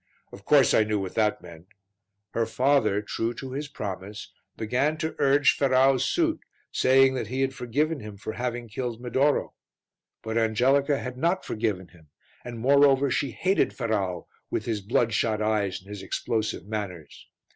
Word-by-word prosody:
Of 100 +1 -13
course 140 -5 +5
I 110 - +5
knew 105 0 -1
what 95 -2 -4
that 105 -2 0
meant. 85 0 -13 0.6
Her 115 -1 0
father, 115 -4 +2
true 115 +2 -3
to 130 +2 -7
his 145 +3 -4
promise, 100 -5 -7 0.2
began 130 +8 0
to 160 0 -3
urge 140 +1 +4
Ferrau's 135 -1 +3
suit, 330 - +1 0.3
saying 130 +1 +4
that 125 -5 -3
he 130 +4 -2
had 135 0 0
forgiven 145 +6 -1
him 105 -2 -9
for 110 +1 -6
having 120 -1 -4
killed 115 +1 -4
Medoro. 130 +4 +1 0.7
But 110 +1 -1
Angelica 135 +6 +2
had 125 -1 -6
not 175 +5 0
forgiven 105 -5 -2
him, 80 -3 -20 0.4
and 120 -1 -7
moreover 140 +2 +4
she 140 - 0
hated 190 +3 +1
Ferrau 100 -7 -2 0.2
with - - -2
his 110 -3 -2
bloodshot 110 +1 +1
eyes 105 -3 0
and 95 - -21
his 105 -2 -7
explosive 110 +3 -2
manners. 100 -8 -6
120 Hz, 160 wpm, -26 LUFS, 105-135 Hz, 0.7 s, course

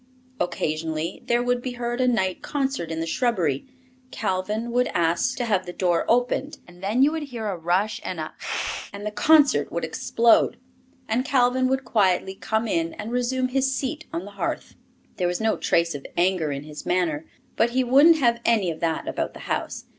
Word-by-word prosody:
Occasionally 160 0 -2
there 240 0 +2
would 245 0 0
be 250 0 -4
heard 240 +1 -2
a 255 - +3
night 190 -7 +1
concert 270 - -2
in 160 0 -3
the - - -1
shrubbery. 175 - 0 0.4
Calvin 210 +2 -2
would 250 +1 +2
ask 170 +9 +1
to 245 - -1
have 195 -5 0
the 175 - -5
door 175 -2 +1
opened, 245 +4 +1
and 175 0 -16
then 215 +7 +2
you 290 - +4
would 320 0 -3
hear 235 -3 -5
a 200 -3 -1
rush 180 +6 0
and - - -4
a - - -5
"pestzt," - - -4
and 200 +1 -8
the 210 - -2
concert 285 - +4
would 170 -1 -2
explode, 230 +7 +3 0.5
and 230 +3 +1
Calvin 255 -1 +2
would 265 0 0
quietly 190 -5 +2
come 220 +3 -1
in 165 -4 -1
and 215 +2 -6
resume 255 +1 0
his 265 +1 +1
seat 295 +4 -3
on 170 +3 -4
the 205 - -10
hearth. 200 - -4 0.4
There 180 - +1
was 175 0 -1
no 220 0 +1
trace 170 0 +1
of 140 -1 -7
anger 175 -3 +2
in 140 0 -4
his 150 0 -9
manner, 165 -4 0 0.3
but 235 - +3
he 255 +2 +1
wouldn't 285 +7 +6
have 235 -4 +2
any 215 -7 +2
of 160 - -8
that 165 -1 -1
about - - -3
the - - -10
house. - - -3
215 Hz, 200 wpm, -24 LUFS, 175-250 Hz, 0.5 s, wouldn't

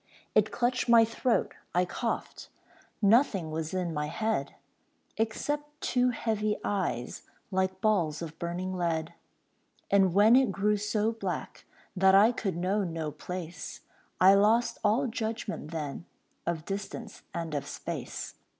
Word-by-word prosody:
It 215 0 +3
clutched 245 0 0
my 230 -1 +8
throat, 230 +2 0 0.2
I 180 +1 +4
coughed; 230 +5 -4 0.5
Nothing 200 - +4
was 160 0 -3
in 180 -3 -2
my 150 -1 -1
head 215 -6 -2 0.6
Except 295 +7 -2
two 250 0 +2
heavy 215 -3 -1
eyes 185 -12 -2 0.3
Like 190 0 0
balls 175 -8 +1
of 160 0 -8
burning 180 +2 -3
lead. 165 -3 -1 0.8
And 190 -3 +4
when 215 +4 +7
it 260 -5 +4
grew 210 +2 +1
so 210 +1 0
black 200 -5 -5 0.3
That 190 0 +5
I 210 +4 +7
could 195 -8 -3
know 190 +4 +1
no 165 -4 -3
place, 175 +3 -7 0.4
I 190 +1 +8
lost 215 +4 +3
all 225 +7 +3
judgment 225 - -4
then, 155 0 -5 0.4
Of 165 -2 -2
distance 200 +1 -6
and 165 -2 -4
of 140 -1 -2
space. - - -5
195 Hz, 135 wpm, -29 LUFS, 170-225 Hz, 0.8 s, my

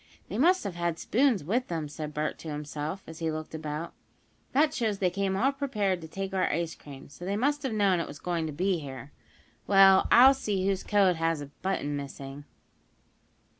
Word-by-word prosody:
"They 205 - -3
must 360 +6 +4
have 200 - -4
had 170 -1 -2
spoons 240 - +2
with 235 - 0
them," 165 -3 -3
said 150 +1 -6
Bert 150 +1 -3
to - - -9
himself, 150 +4 -5
as 160 0 -10
he 165 -1 -1
looked 155 0 -5
about, 155 +1 -5 0.6
"That 300 +2 +3
shows 220 -7 -1
they 185 -2 +1
came 195 +1 -1
all 265 +7 +3
prepared 215 -10 -1
to 160 - -8
take 195 +4 -5
our 190 -1 +1
ice 165 +1 -1
cream. 140 -2 -12
So 145 +5 -13
they 195 +3 -1
must 285 +6 +1
have 265 - -2
known 200 -4 +2
it 170 - -3
was 145 - -9
going 170 0 -2
to - - -4
be 180 +4 0
here. 135 -1 -8 0.6
Well, 195 -1 +6
I'll 260 +3 +9
see 205 -8 -2
whose 195 -1 0
coat 195 -4 +3
has 165 -1 0
a 145 -1 -8
button 165 -6 -1
missing." 140 0 -7
180 Hz, 205 wpm, -28 LUFS, 155-205 Hz, 0.6 s, I'll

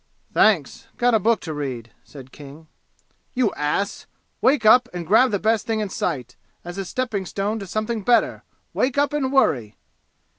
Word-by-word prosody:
"Thanks - - +2
got 245 0 +2
a 220 - +4
book 225 +3 +1
to 160 - -5
read," 130 -6 -5
said 135 -3 -13
King. 145 +2 -13 0.7
"You 245 -5 +1
ass! 150 +7 -2 0.3
Wake 260 -3 +3
up 245 +3 +6
and 175 -1 -4
grab 225 +8 +4
the 205 - 0
best 220 +2 0
thing 225 -1 0
in 210 -2 -2
sight, 130 -10 -3 0.3
as 175 +2 -7
a 195 - -3
stepping 210 -3 -3
stone 205 +4 -2
to 195 - -8
something 215 +3 -2
better! 240 +4 +2 0.3
Wake 260 +1 0
up 285 0 +2
and 270 -3 -1
worry!" 130 - +1
205 Hz, 175 wpm, -22 LUFS, 155-240 Hz, 0.7 s, up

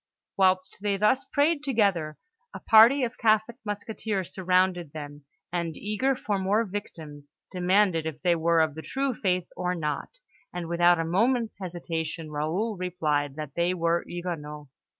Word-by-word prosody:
Whilst 185 -1 +2
they 200 -1 0
thus 210 +6 +2
prayed 295 +1 +1
together, 200 - +1 0.4
a - - -5
party 235 +5 +6
of 240 0 -3
Catholic 220 +1 +2
musketeers 205 -2 -4
surrounded 180 -3 +1
them, 145 -2 -8 0.3
and, 170 -2 -2
eager 215 +6 0
for 210 -5 -2
more 205 +4 +1
victims, 155 -8 -8 0.2
demanded 180 -2 +2
if 155 -1 -6
they 175 -2 +4
were 165 0 +3
of 160 -2 +1
the 160 - -7
true 270 +7 -2
faith 185 -5 -1
or 180 0 -1
not; 150 - -4 0.3
and 175 -1 -5
without 175 +1 +4
a 165 - -1
moment's 225 +7 +1
hesitation, 165 -3 -4
Raoul 175 +9 -2
replied 150 -6 -1
that 150 -3 -6
they 175 +2 +1
were 170 0 +1
Huguenots. 150 -5 -6
180 Hz, 150 wpm, -27 LUFS, 160-210 Hz, 0.4 s, party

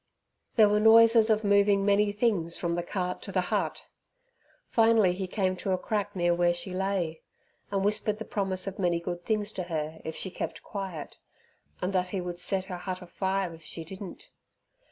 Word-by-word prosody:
There 220 -3 +7
were 210 +1 +3
noises 225 +1 +7
of 215 0 +3
moving 200 -1 +4
many 205 0 +3
things 205 -6 0
from 170 -1 -1
the 175 - 0
cart 180 0 -3
to 195 - -6
the 185 - +1
hut. - - -1 0.8
Finally 225 -5 +4
he 190 +1 -4
came 185 -1 0
to 190 +1 -1
a - - +1
crack 205 +2 -2
near 175 -1 +2
where 175 0 +2
she 175 +2 -5
lay, 185 -4 -1 0.5
and 195 -1 0
whispered 210 0 +1
the 220 - -6
promise 190 -2 -2
of 195 0 -6
many 175 -2 +1
good 175 +1 -5
things 210 +1 -1
to 185 - -4
her 160 -2 -4
if 160 0 -5
she 190 - -2
kept - - -5
quiet, 190 -7 -6 0.6
and 185 +2 -1
that 185 -1 +1
he 190 +1 -3
would 175 -1 -5
set 190 0 0
her 185 -2 -5
hut 185 0 -5
afire 190 0 -2
if 165 - -13
she 165 +1 -7
didn't. 190 +2 -9
190 Hz, 195 wpm, -28 LUFS, 175-205 Hz, 0.8 s, There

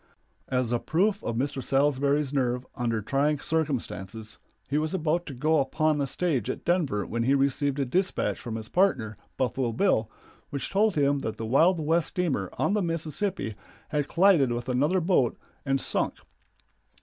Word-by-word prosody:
As 125 -2 0
a 120 - +1
proof 200 - 0
of 115 - -2
Mr. 135 +2 -1
Salsbury's 140 +1 +1
nerve 125 -2 0
under 115 -3 -1
trying 140 +5 +1
circumstances, 115 - -3 0.3
he 145 +2 +1
was 155 +4 -1
about 170 0 0
to 140 - -6
go 155 +4 +2
upon 155 +2 +1
the 140 - 0
stage 140 - -1
at - - -4
Denver 150 - +1
when 115 +1 -3
he 135 +4 +3
received 140 0 +1
a 140 - 0
dispatch 185 +9 0
from 115 -2 -5
his 110 -1 -6
partner, 120 - +1 0.2
Buffalo 130 -1 0
Bill, 115 - +1 0.4
which 140 - -4
told 205 +1 +2
him 140 -1 +2
that 110 - -4
the 115 - -4
Wild 160 +10 +4
West 160 +2 +1
steamer 180 -6 -1
on - - +1
the 210 - +1
Mississippi 165 - -2 0.4
had 150 -2 -1
collided 170 -8 +4
with 120 0 -3
another 145 +9 +2
boat 165 -8 +2 0.3
and 135 0 +2
sunk. - - 0
140 Hz, 170 wpm, -27 LUFS, 125-165 Hz, 0.4 s, Wild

